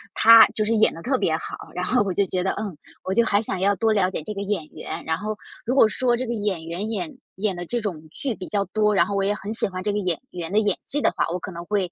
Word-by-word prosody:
他 230 0 +9
就 215 - +1
是 225 +2 +1
演 220 - +4
得 165 - -10
特 260 0 +1
别 160 -1 +1
好， - - -6 0.2
然 180 0 -2
后 250 -3 +2
我 195 - -2
就 200 +2 +2
觉 185 0 -2
得， 190 - +1
嗯， 205 -5 -5 0.3
我 190 - -2
就 235 +4 +4
还 205 -2 +2
想 195 -4 -3
要 200 +2 +2
多 225 +1 +2
了 195 -3 +2
解 185 - -5
这 210 - -5
个 200 - -5
演 200 -5 -2
员。 160 +2 -7
然 160 0 0
后， 215 +3 -3 0.3
如 250 +3 0
果 225 - +7
说 245 +2 +1
这 255 - -3
个 235 - -2
演 205 -7 -2
员， 175 +6 -4
演 290 +7 -4 0.2
演 195 -1 -1
得 175 - -5
这 240 +7 -2
种 185 -8 -4
剧 260 - -3
比 185 - -8
较 200 -1 0
多， 210 -1 +1
然 170 -3 +5
后 200 +2 -3
我 195 - +1
也 200 +1 +2
很 205 +2 -5
喜 225 - +1
欢 185 -1 -6
这 210 - 0
个 210 - 0
演 180 -4 -1
员 175 0 -6
的 210 - +4
演 205 -3 +1
技 290 +1 +2
的 - - +3
话， - - 0
我 180 - -2
可 190 - -7
能 170 0 -7
会， 195 -3 -1
200 Hz, 325 characters per minute, -24 LUFS, 180-220 Hz, 0.3 s, 他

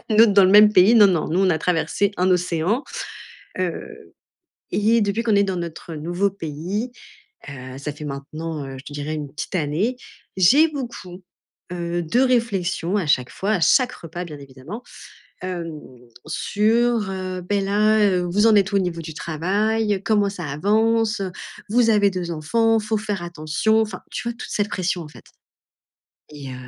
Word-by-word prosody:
à - - -25
une 215 0 +5
autre 225 -3 +5
dans 200 - +7
le 185 - +4
même 210 +1 +8
pays. 195 +4 +6
Non, 210 -2 +8
non, 175 -6 0
nous, 170 - 0
on 190 -1 +3
a 160 - +1
traversé 180 +4 0
un 185 +1 +2
océan, 180 - 0 0.8
heu. 180 -2 -5 0.6
Et 220 +2 +3
depuis 205 +2 0
qu'on 220 -3 +2
est 200 - +4
dans 190 -2 -2
notre 170 -1 -6
nouveau 175 +6 -1
pays, 185 - -4 0.6
heu, 130 -1 -8
ça 145 +1 -5
fait 150 +1 -10
maintenant, 150 +2 -5
heu, 135 0 -8
je 130 - -12
te 145 - -10
dirais 145 +2 -4
1 150 -2 -5
petite 155 - -6
année, 170 - -1 0.4
j'ai 265 - +5
beaucoup, 235 - -7 0.5
heu, 175 0 -2
de 200 +10 +1
réflexions 200 -8 +1
à 190 -6 -1
chaque 125 -4 +1
fois, 200 +3 -2
à 205 - +1
chaque 250 +8 +4
repas 175 +2 -7
bien 155 -4 -9
évidemment. 140 - -10 0.6
Hem, 170 -4 -5 0.5
sur, 220 +5 +1
heu: 185 -1 -4
«Beh, 205 -1 +1
là, 210 +2 +2
heu, 195 -3 +3
vous 205 +5 +3
en 225 - +6
êtes 200 +1 +3
où - - +2
au - - +5
niveau 175 -3 -2
du 160 0 -7
travail? 205 +7 0
Comment 210 -3 +2
ça 185 -3 -7
avance? 215 +8 +1 0.5
Vous 235 0 +4
avez 205 -2 +4
2 180 -2 -4
enfants, 225 +9 +1
faut 215 0 -1
faire 205 -4 -3
attention!» 175 +6 0
Enfin, 210 -4 -6
tu 245 - -3
vois, 235 - -3
toute - - -8
cette 205 -1 0
pression, 185 -1 -1
en 155 - -10
fait. - - -15 1.1
Et 145 -3 -9
heu, - - -7
185 Hz, 185 wpm, -22 LUFS, 165-215 Hz, 1.1 s, même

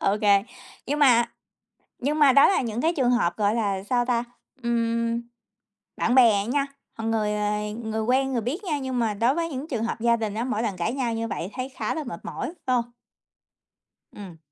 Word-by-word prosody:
Ô 195 - +2
kê. 200 -2 +5 0.4
Nhưng 290 +2 -1
mà 245 -5 +6 0.8
nhưng 295 +4 -1
mà 285 -3 +7
đó 280 +1 +7
là 390 - +2
những 235 -1 -3
cái 330 +2 +2
trường 250 -3 +3
hợp, 225 -8 +1
gọi 210 +1 +2
là, 200 -4 -1
sao 245 +3 +1
ta, 240 -1 +1 0.4
ừm, 230 0 0 0.8
bạn 245 - +1
bè 225 -6 +5
nha, 275 +3 0 0.3
còn 225 0 -2
người, 210 -2 0
ờ, 210 0 0 0.3
người 220 0 -2
quen 265 +3 +1
người 240 - 0
biết 315 - -3
nha 305 -5 -1
nhưng 260 -2 -3
mà 225 -3 +1
đối 235 +6 +2
với 335 0 -1
những 285 +1 -6
trường 230 -4 -2
hợp 235 - -3
gia 235 0 +3
đình 220 -3 -3
á, 230 - -2
mỗi 235 -3 -1
lần 210 -5 -2
cãi 180 +7 -1
nhau 245 -4 -1
như 230 0 -2
vậy 185 -1 -4
thấy 255 +1 -4
khá 265 - -3
là 315 - -4
mệt 225 -10 -7
mỏi, 165 - -4 0.2
phải 255 - +2
hông? 235 - +1 1.3
Ừm. 185 -5 -10
235 Hz, 215 wpm, -25 LUFS, 215-260 Hz, 1.3 s, mà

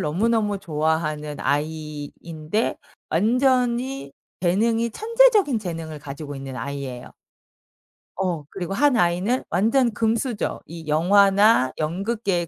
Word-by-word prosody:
너무너무 210 +5 +1
좋아하는 155 -3 -1
아이인데 155 +4 -3 0.3
완전히 250 - +1 0.3
재능이 225 +6 +1
천재적인 440 - +3
재능을 165 -6 -6
가지고 145 +1 -7
있는 135 -1 -7
아이예요. 140 -3 -6 1.0
어 180 -5 -2
그리고 185 0 -5
1 280 +3 +3
아이는 180 +9 +1
완전 230 +7 +2
금수저. 225 +1 -1
이 165 -1 -10
영화나 195 - +4
연극계의 185 +2 -1
185 Hz, 260 characters per minute, -23 LUFS, 155-230 Hz, 1.0 s, 영화나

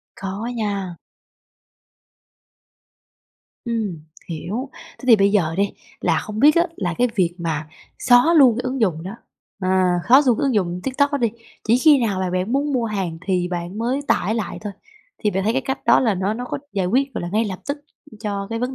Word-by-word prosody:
Khó 195 +3 -5
nha. 200 -5 -2 2.7
Ừm, 210 -10 -3 0.2
hiểu. 205 - -4 0.3
Thế - - -11
thì 230 -3 +8
bây 200 0 +3
giờ 165 -6 +2
đi 200 0 +1 0.3
là - - +2
không 215 0 -5
biết 295 +3 +7
á, 340 +1 +4
là 175 -4 -2
cái 245 0 +3
việc 175 -5 +1
mà 155 -3 -3 0.3
xóa 250 +7 +5
luôn 255 -6 +6
cái 250 - -2
ứng 255 0 -3
dụng 170 -7 +1
đó, 190 +5 -6 0.5
à, 185 -1 +2
xóa 265 +4 +8
luôn 245 -3 +3
cái - - -1
ứng 265 -4 +1
dụng 180 -3 0
TikTok 285 +2 +1
đó 285 - +1
đi, 235 -2 +2 0.4
chỉ 240 +2 +5
khi 295 0 +6
nào 190 -3 -2
mà 185 -1 -1
bạn 185 +5 -1
muốn 280 +2 0
mua 245 -3 0
hàng 190 -7 -3
thì 180 -2 0
bạn 175 +3 -5
mới 245 +4 0
tải 215 +5 +1
lại 225 - -3
thôi, 205 -2 -6 0.5
thì 210 - 0
bạn 190 +1 -1
thấy 220 - +2
cái 265 +2 0
cách 265 0 -2
đó - - +5
là 225 -5 +2
nó 190 +3 -1
nó 245 +2 -5
có - - -4
giải 190 -3 0
quyết, 265 +6 +1
gọi - - -3
là, 175 - -4
ngay 220 +2 +2
lập 190 -3 -4
tức 285 +1 -2 0.4
cho 200 -2 -3
cái 230 - -2
vấn 250 +2 -2
210 Hz, 210 wpm, -21 LUFS, 185-250 Hz, 2.7 s, thì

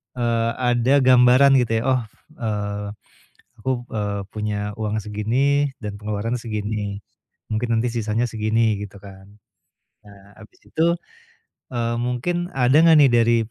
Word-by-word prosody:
eee, 115 -1 0
ada 125 +1 +2
gambaran 130 +2 +6
gitu 120 -2 0
ya. - - -5
Oh, 125 - 0 0.4
eee, 105 -2 -3 0.7
aku, 130 - -1 0.2
eee, 100 -2 -2
punya 105 -1 -3
uang 110 -1 -2
segini 125 +8 0
dan 105 -3 -6
pengeluaran 105 +3 -3
segini. 105 -3 -4 0.5
Mungkin 115 +2 -1
nanti 125 - 0
sisanya 115 +1 -1
segini 110 0 +1
gitu 100 0 -10
kan. 95 -1 -13 0.8
Nah 100 -1 -15 0.2
habis 105 - -17
itu, 165 +11 +1 0.8
eee, 120 -2 -1
mungkin 150 +9 -2
ada 130 +2 +3
enggak 165 -1 +6
nih 140 -4 +6
dari 115 0 +4
115 Hz, 135 wpm, -22 LUFS, 105-125 Hz, 0.8 s, gambaran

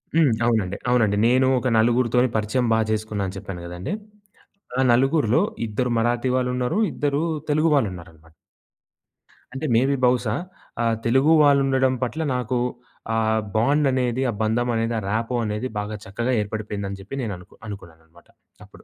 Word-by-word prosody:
హ్మ్. 160 -6 +4
అవునండి. 105 -5 0
అవునండి. 110 -5 +3
నేను 130 +2 +3
ఒక 130 - -2
నలుగురితోని 120 +2 +3
పరిచయం 110 +4 0
బా 110 - +3
జేసుకున్నానని 105 -3 -2
చెప్పాను 95 -3 -7
గదండీ! 90 - -5 0.9
ఆ - - +4
నలుగురులో 135 +1 +3 0.3
ఇద్దరు 120 +4 -1
మరాఠీ 120 +2 +1
వాళ్ళున్నారు, 125 +5 0
ఇద్దరు 145 0 -1 0.3
తెలుగు 155 +2 +3
వాళ్ళు 135 -7 +3
ఉన్నారనమాట. 80 -2 -14 1.2
అంటే, 135 +3 -4
మే 115 - +5
బీ 140 - +1
బహుశా 125 -3 +1 0.5
ఆహ్, 115 -1 +1
తెలుగు 130 +6 +3
వాళ్ళు 140 -1 +5
ఉండడం 130 -1 +2
పట్ల 140 +6 -3
నాకు 125 0 -1 0.6
ఆహ్, 110 0 +1
బాండ్ 140 +6 +3
అనేది, 125 -1 0
ఆ - - -7
బంధమనేది, 115 0 0
ఆ - - -6
రాపో 115 +3 -1
అనేది, 105 +4 -3
బాగా 105 +1 -4
చక్కగా 120 +6 -2
ఏర్పడిపోయిందని 100 -2 -5
జెప్పి 110 +8 -7
నేను 105 -5 -3
అనుకు 90 - -17
అనుకున్నాననమాట 85 -4 -12 0.4
అప్పుడు. - - -18
115 Hz, 145 wpm, -23 LUFS, 105-130 Hz, 1.2 s, మే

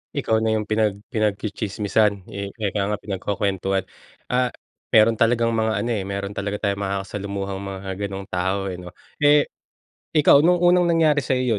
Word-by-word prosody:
Ikaw 110 0 +1
na 110 0 +1
yung 105 - 0
pinag 105 -1 0
pinag-tsi-tsismisan, 105 -1 0
eh, 100 0 -4
ika 105 -2 -2
nga 105 - 0
pinagkukuwentuhan. 95 -1 -1 0.5
Ah, 125 0 +2 0.5
meron 110 0 +5
talagang 115 0 +3
mga 110 -2 0
ano, 120 - -2
eh, 105 -4 -1
meron 100 0 -4
talaga 100 0 -3
tayong 100 0 0
makakasalamuhang 100 0 -4
mga 95 -1 -6 0.2
ganung 100 0 -6
tao, 95 +2 -1
eh, 90 - -7
'no? 90 -1 -11 0.2
Eh 145 0 +5 0.7
ikaw, 145 -2 +6
no'ng 175 +1 +4
unang 175 0 +5
nangyari 155 -3 +3
sa'yo 125 -4 0
105 Hz, 155 wpm, -22 LUFS, 100-115 Hz, 0.7 s, ikaw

